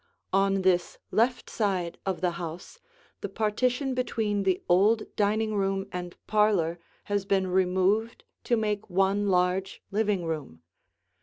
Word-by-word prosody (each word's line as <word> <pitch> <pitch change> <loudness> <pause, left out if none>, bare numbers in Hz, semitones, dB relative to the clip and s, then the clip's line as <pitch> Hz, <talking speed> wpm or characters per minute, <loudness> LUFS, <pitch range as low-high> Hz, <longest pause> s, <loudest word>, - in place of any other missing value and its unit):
On 195 0 +2
this 180 -1 +2
left 245 +3 +1
side 185 -6 -1
of 190 -2 -1
the 180 -1 +2
house 170 - -7 0.4
the 205 - -5
partition 250 +6 0
between 220 -5 -1
the 190 -2 0
old 205 +5 +4
dining 215 +1 +1
room 195 -1 0
and 180 -1 -6
parlor 200 -6 +2 0.2
has 205 -1 -1
been 195 -1 +1
removed 190 +4 +1 0.2
to 240 - +2
make 210 -1 -2
one 195 +2 +2
large 180 +1 0
living 205 -3 0
room. 145 - -5
195 Hz, 135 wpm, -27 LUFS, 180-215 Hz, 0.4 s, old